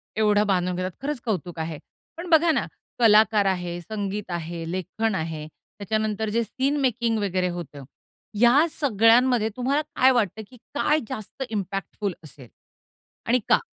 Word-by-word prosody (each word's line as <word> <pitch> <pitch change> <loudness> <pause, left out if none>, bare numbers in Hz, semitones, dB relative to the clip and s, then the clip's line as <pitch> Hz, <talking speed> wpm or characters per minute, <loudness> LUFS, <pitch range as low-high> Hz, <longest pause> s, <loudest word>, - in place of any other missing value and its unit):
एवढं 210 -1 +3
बांधून 180 -2 +1
घेतात. 185 +1 -3
खरंच 290 -1 -3
कौतुक 180 -6 -3
आहे. 160 -1 -4 0.4
पण 345 +1 -6
बघा 330 0 +5
ना, - - 0 0.3
कलाकार 215 -2 +5
आहे, 180 -2 -1
संगीत 200 +1 -4
आहे, 170 0 -4
लेखन 190 +4 -2
आहे. 160 -2 -4
त्याच्यानंतर 215 +5 -3
जे 230 +2 +1
सीन 270 +6 -1
मेकिंग 235 -3 +1
वगैरे 185 -3 0
होतं 165 -5 -7 0.6
या 250 +6 +6
सगळ्यांमध्ये 235 -2 +3
तुम्हाला 270 +4 0
काय 260 +1 +5
वाटतं, 220 -4 0
की 250 - -16 0.2
काय 300 +1 +2
जास्त 215 +5 -6
इम्पॅक्टफुल 200 -1 -3
असेल? 135 -4 -12 0.8
आणि 245 +2 +3
का? - - +6
210 Hz, 145 wpm, -24 LUFS, 180-240 Hz, 0.8 s, या